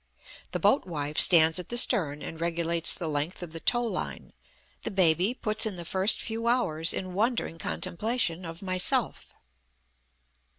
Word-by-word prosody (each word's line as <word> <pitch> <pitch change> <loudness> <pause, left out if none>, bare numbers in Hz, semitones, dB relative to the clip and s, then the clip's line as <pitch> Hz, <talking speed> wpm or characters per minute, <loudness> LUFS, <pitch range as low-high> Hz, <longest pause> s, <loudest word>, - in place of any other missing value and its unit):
The - - -3
boat 270 - +2
wife 150 -3 -3
stands 165 -1 +5
at 180 - -8
the 240 - -2
stern 150 -10 +2
and 160 0 -8
regulates 170 0 0
the 170 - -5
length 155 +4 -3
of 165 -2 -9
the 165 - -7
tow 240 +7 +1
line; 230 - -5 0.5
the - - -4
baby 185 +3 +1
puts 215 -2 +1
in 205 - -5
the 170 -1 -8
first 190 +5 +2
few 230 +1 -4
hours 165 -10 +1
in 185 -1 -4
wondering 215 -4 -1
contemplation 185 +1 -2
of 165 +2 -9
myself. 185 -1 +1
180 Hz, 160 wpm, -27 LUFS, 165-215 Hz, 0.5 s, stands